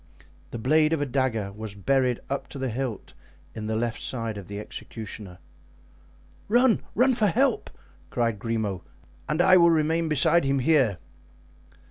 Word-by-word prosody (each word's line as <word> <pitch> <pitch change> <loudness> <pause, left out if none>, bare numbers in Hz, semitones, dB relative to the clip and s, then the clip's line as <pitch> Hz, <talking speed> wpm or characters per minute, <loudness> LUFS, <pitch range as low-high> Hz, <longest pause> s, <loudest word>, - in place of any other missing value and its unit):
The - - -6
blade 155 +6 +3
of 160 - 0
a - - +1
dagger 125 -6 -1
was 105 0 -8
buried 125 +4 +1
up 140 0 -3
to - - -9
the 130 -1 -2
hilt 120 -3 -4 0.4
in 110 -1 -6
the 110 - -1
left 115 +1 -2
side 115 -4 -3
of 100 -3 -8
the 100 0 -6
executioner. 105 -3 -8 1.1
"Run! 240 +2 +4
run 255 +3 +4
for 220 -3 +2
help!" 170 - +1 0.4
cried 115 -3 -1
Grimaud, 110 -4 -2 0.5
"and 155 +3 +2
I 185 0 +7
will 170 -1 +6
remain 165 0 +1
beside 155 +3 +3
him 135 0 +1
here." 130 - +3
130 Hz, 155 wpm, -26 LUFS, 110-155 Hz, 1.1 s, I